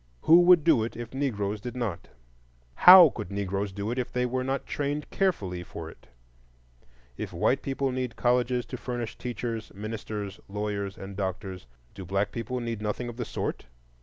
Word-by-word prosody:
Who 170 +2 +7
would 175 -3 +7
do 145 -9 +4
it 115 - -5
if 120 0 -7
Negroes 105 -7 -2
did 125 +3 -6
not? 115 -8 -3 0.7
How 180 - +10
could 105 - -6
Negroes 100 0 -2
do 100 +3 -4
it 125 - -2
if 125 - -3
they 125 0 0
were 130 +1 -1
not 135 +1 -2
trained 145 +1 -2
carefully 100 - 0
for 90 - -8
it? - - -20 1.1
If - - -5
white - - +1
people 135 0 -1
need 125 -2 -3
colleges 125 0 +1
to 125 - -6
furnish 120 -2 -4
teachers, 115 -2 -4
ministers, 105 -1 -5
lawyers, 100 -1 -3
and 95 0 -8
doctors, 95 - -4 0.3
do 95 - -8
black 100 +3 -1
people 120 +2 -4
need 115 -3 -4
nothing 110 +3 -3
of 120 - -9
the 120 - -3
sort? - - -4
115 Hz, 175 wpm, -27 LUFS, 100-125 Hz, 1.1 s, How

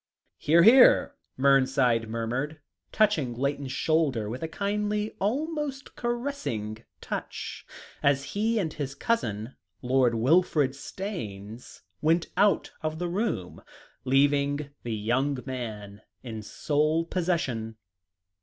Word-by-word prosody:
"Hear, 165 +3 +5
hear," 250 +6 +7 0.2
Mernside 130 -4 +3
murmured, 120 +7 -3 0.3
touching 165 - +2
Layton's 140 +1 -2
shoulder 140 -7 +1
with 125 - -6
a 160 - -2
kindly, 210 +4 -2
almost 280 +5 -2
caressing 145 - -3 0.2
touch, - - -6 0.3
as 140 -1 +3
he 225 +3 +1
and 165 -7 -1
his 140 -3 -5
cousin, 115 - -2 0.3
Lord 125 -1 +3
Wilfrid 145 +3 +3
Staynes, 120 - -7 0.2
went 165 +2 +2
out 205 0 +3
of 155 -1 -3
the 175 +1 -2
room, 180 - -2 0.4
leaving 140 +2 +2
the 115 -2 -3
young 125 +7 0
man 110 -6 -6 0.2
in 110 -3 -6
sole 155 +8 0
possession. 160 -11 -1
145 Hz, 105 wpm, -27 LUFS, 120-185 Hz, 0.4 s, hear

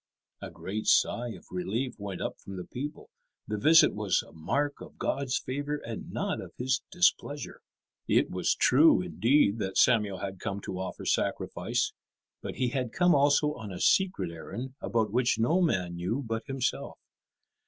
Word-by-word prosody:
A - - -6
great 105 +3 -5
sigh 120 +1 +3
of 115 - -9
relief 110 +8 -2
went 100 -2 -5
up - - -4
from 95 -1 -8
the 90 - -5
people. 145 +9 -7 0.4
The 105 0 -2
visit 160 +8 +6
was 105 -2 0
a - - -16
mark 140 - -2
of - - -11
God's 135 -2 -1
favour 145 +3 -3
and 115 -6 -7
not - - -2
of - - -11
His 130 +2 0
displeasure. 175 -5 0 0.5
It - - +2
was - - +1
true, 315 - +5
indeed, 120 - +2
that 95 -2 -2
Samuel 105 -6 +4
had 95 -1 -6
come 100 -1 -3
to 95 -1 -5
offer 95 - -5
sacrifice, - - -1 0.5
but - - -6
he 125 -1 0
had 125 -2 -2
come 180 0 +4
also 145 +1 +3
on 110 -7 -8
a 90 - -6
secret 185 - +2
errand 120 +10 -7
about 110 -3 0
which 125 -1 +2
no 155 +11 +2
man 90 - 0
knew 110 +11 -2
but 115 +3 -4
himself. 135 -2 -2
120 Hz, 170 wpm, -29 LUFS, 100-145 Hz, 0.5 s, visit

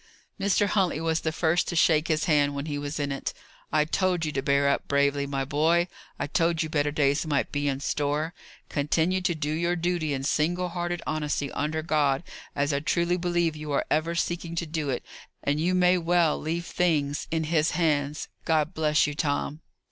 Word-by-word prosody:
Mr. 200 +1 +2
Huntley 190 -5 +1
was 165 0 0
the 160 - -1
first 165 +2 +1
to 175 - -3
shake 160 -1 +4
his 155 -1 +1
hand 145 -3 +2
when 140 +1 -3
he 145 -2 -3
was 145 +2 -4
in 145 -1 -1
it. 135 - -3 0.4
"I 150 -1 +3
told 180 0 0
you 155 - -2
to 135 - -1
bear 140 0 +2
up 140 - 0
bravely, 140 0 +2
my 135 -1 -2
boy! 160 +5 +2 0.3
I - - -2
told 165 +2 +1
you 160 - -4
better 145 -1 +1
days 145 -1 +2
might 145 -2 0
be 145 0 -1
in 135 -1 -1
store. 150 +3 -1 0.3
Continue 160 +5 +1
to 175 -2 0
do 150 -1 -2
your 170 +3 0
duty 170 -2 -1
in 135 - -4
single 175 +5 0
hearted 175 0 -3
honesty, 150 -2 -2
under 155 +2 -2
God, 145 -3 +1 0.3
as 145 +1 +1
I 140 - +1
truly 170 +4 +1
believe 175 -2 0
you 150 -1 -6
are - - +1
ever 165 +2 +1
seeking 170 0 -2
to 170 - -1
do 155 -2 -3
it, 125 - -2 0.4
and 145 +1 +1
you 180 +3 +1
may 180 0 +4
well 170 -2 +2
leave 165 +2 -3
things 150 -6 0
in 160 0 0
His 155 0 +2
hands. 150 -3 0 0.2
God 155 +1 +1
bless 155 -2 +2
you, 150 - -2
Tom!" 145 +1 -2
155 Hz, 200 wpm, -27 LUFS, 145-170 Hz, 0.4 s, shake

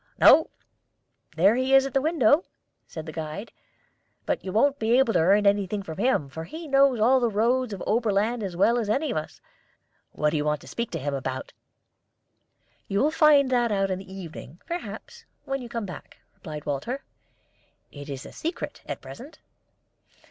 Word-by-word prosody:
"No; 320 - +7 0.9
there 190 +6 +5
he 260 +2 +2
is 270 0 +6
at 275 - -5
the 270 - +2
window," 305 0 +3 0.4
said 160 -1 -8
the 160 - -7
guide. 160 +7 -6 0.7
"But - - -1
you 190 - -5
won't 280 +7 +2
be 230 +2 +3
able 265 -4 +3
to 175 - +3
earn 200 +5 +4
anything 200 0 +1
from 160 -1 -8
him, 235 - +1
for 160 +4 -7
he 315 - -8
knows 275 -3 +4
all 255 +5 +4
the 240 -2 +1
roads 235 +3 +1
of 200 - -4
the - - -5
Oberland 220 +1 +1
as 185 -4 -5
well 235 +6 +3
as 215 -3 -3
any 275 +6 0
of - - -2
us. 155 - -6 0.7
What 150 0 0
do 155 - 0
you 150 - 0
want 150 0 0
to - - -14
speak 235 -1 -4
to 165 - -2
him 145 +1 -3
about?" 130 -1 -4 1.3
"You 200 - -2
will 295 +3 +3
find 295 -4 +5
that 240 -2 +2
out 195 -1 +1
in 185 - -2
the 190 0 -12
evening, 170 -4 -9
perhaps, 345 +1 -7 0.2
when 270 0 -3
you 240 - -8
come 230 -3 -4
back," 180 - -10 0.2
replied 150 -2 -9
Walter. 150 - -3 0.9
"It 145 0 -10
is 135 -1 -6
a - - -10
secret 330 +2 -5
at - - -5
present." 275 +7 -11
215 Hz, 190 wpm, -26 LUFS, 165-260 Hz, 1.3 s, No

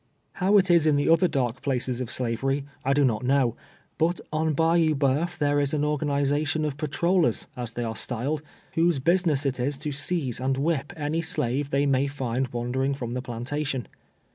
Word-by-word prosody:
How 195 +3 +3
it 185 -2 +4
is 170 -2 +5
in 145 -2 +4
other 165 +2 +5
dark 130 -5 -1
places 130 -2 -1
of 125 - -4
slavery, 135 +3 -1 0.2
I 135 - +2
do 145 0 +3
not 115 -1 0
know, 130 -2 +2 0.4
but 170 +2 +2
on 155 0 +1
Bayou 165 0 +3
Bceuf 145 +6 0
tliere 145 -2 +2
is 140 +1 0
an 150 0 +1
organization 145 +1 0
of 145 -2 -2
patrollers, 160 - +1
as 120 -2 -5
they 120 - -3
are 110 -1 -3
styled, 135 +7 -2 0.3
whose 165 -1 +3
business 160 -1 +2
it 135 -2 -1
is 135 +3 -1
to 150 +1 -4
seize 140 -4 -1
and 130 +1 0
whip 145 -1 0
any 155 +2 -1
slave 145 -5 -1
they 140 +1 +1
may 135 0 +2
fiad 130 -2 -2
wandering 130 +3 -1
from 120 -3 -5
the 125 - -2
plantation. 130 +2 -3
140 Hz, 185 wpm, -26 LUFS, 130-155 Hz, 0.4 s, is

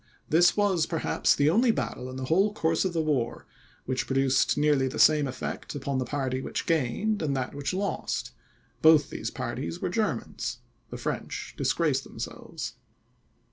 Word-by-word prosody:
This 175 +4 +5
was, 190 -6 +2
perhaps, 165 -2 +1
the 145 +2 +3
only 235 +7 +4
battle, 130 - -1
in 130 - -7
the 130 0 -4
whole 195 +8 +2
course 165 -1 +1
of 185 - -1
the 165 -1 +1
war, 135 -6 -1 0.4
which 130 0 -2
produced 135 +1 +2
nearly 145 -3 +3
the 130 - -5
same 150 -2 +5
effect 130 +3 -5
upon 140 -1 -2
the 130 - -1
party 130 -1 -2
which - - -4
gained, 165 - 0
and 140 -4 0
that 130 -1 -3
which 140 0 -3
lost; 195 +2 -2 0.5
both 155 -2 +6
these - - -3
parties 85 - -4
were - - -2
Germans; - - -2 0.3
the - - -6
French - - -4
disgraced - - +1
themselves. - - -7
150 Hz, 165 wpm, -27 LUFS, 130-170 Hz, 0.5 s, both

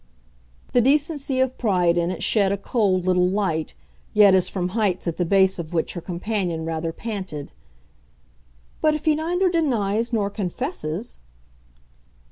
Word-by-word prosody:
The 245 - +5
decency 285 0 +1
of 260 0 0
pride 180 -7 +2
in 170 0 +1
it 185 - -4
shed 200 -3 +2
a 200 - 0
cold 195 -4 0
little 180 -1 +3
light 185 - -1 0.4
yet 205 -2 +7
as 185 -1 +3
from 180 -2 -2
heights 190 -3 -1
at 170 - -2
the 175 - 0
base 190 +1 +3
of 170 0 -6
which 160 - 0
her 175 - -6
companion 180 -2 -3
rather 165 0 -2
panted. 185 -8 -6 1.3
"But 310 -1 +3
if 305 +1 -6
he 310 - +4
neither 345 +5 0
denies 235 - 0
nor 205 -3 0
confesses 205 - -4
200 Hz, 150 wpm, -23 LUFS, 175-245 Hz, 1.3 s, yet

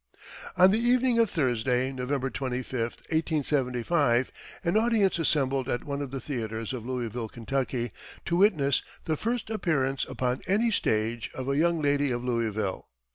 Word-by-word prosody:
On 185 +1 +7
the 215 - +2
evening 245 0 +3
of 230 -3 +4
Thursday, 125 -3 +1
November 135 +1 -2
25, 130 -2 -3
1875, 130 0 0 0.3
an 170 +1 +1
audience 220 -5 +3
assembled 135 -4 +1
at 120 - -1
one 140 0 -3
of 140 - -4
the 135 +1 -4
theatres 115 -3 -4
of 125 -3 -5
Louisville, 120 -3 -3
Kentucky, 120 0 -2 0.3
to 170 - 0
witness 155 -9 +3 0.2
"the 160 - 0
first 230 +5 -2
appearance 140 -10 0
upon 125 0 -1
any 220 +5 +2
stage" 110 - 0
of 130 0 -5
"a 140 - +1
young 170 +2 +2
lady 145 0 +2
of 120 -1 -2
Louisville." 110 -5 -2
135 Hz, 150 wpm, -28 LUFS, 125-170 Hz, 0.3 s, On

